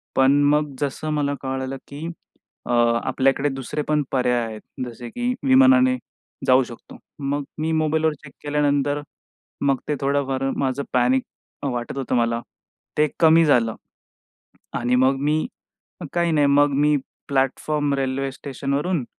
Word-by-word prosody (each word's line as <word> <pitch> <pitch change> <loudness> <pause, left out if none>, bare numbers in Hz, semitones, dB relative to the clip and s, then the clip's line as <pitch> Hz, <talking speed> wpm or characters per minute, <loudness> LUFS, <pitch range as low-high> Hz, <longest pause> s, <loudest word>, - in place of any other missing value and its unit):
पण 135 +2 +4
मग 150 -1 +1
जसं 145 +2 -2
मला 145 -1 0
कळालं 130 0 -3
की, 145 +3 -7 0.6
अ, - - -3 0.3
आपल्याकडे 135 +2 +1
दुसरे 135 +3 -4
पण 150 -1 +2
पर्याय 125 -2 +1
आहेत. 110 -1 -7 0.2
जसे 120 0 -8
की 245 - -1
विमानाने 260 -1 +6 0.5
जाऊ 130 +1 +6
शकतो. 120 -2 -11 0.2
मग 140 0 -1 0.2
मी 160 +1 0
मोबाईलवर 155 0 +1
चेक 140 - -12
केल्यानंतर 145 0 +1 0.6
मग 135 -2 +3
ते 150 - 0
थोडंफार 135 -1 0
माझं 135 +1 -1
पॅनिक 125 +1 +3 0.4
वाटत 125 -1 -3
होतं 130 -2 -1
मला, 115 0 +1 0.6
ते 150 0 +4
कमी 165 0 +6
झालं 115 -6 +3 1.0
आणि 120 +1 +1
मग 130 +2 +4
मी, 150 +2 +1 0.7
काही 170 -1 +1
नाही 145 -2 +4
मग 145 +1 +4
मी 150 +1 +3 0.3
प्लॅटफॉर्म 140 +2 0
रेल्वे 135 0 -1
स्टेशनवरून 140 +3 -2
140 Hz, 135 wpm, -23 LUFS, 130-150 Hz, 1.0 s, विमानाने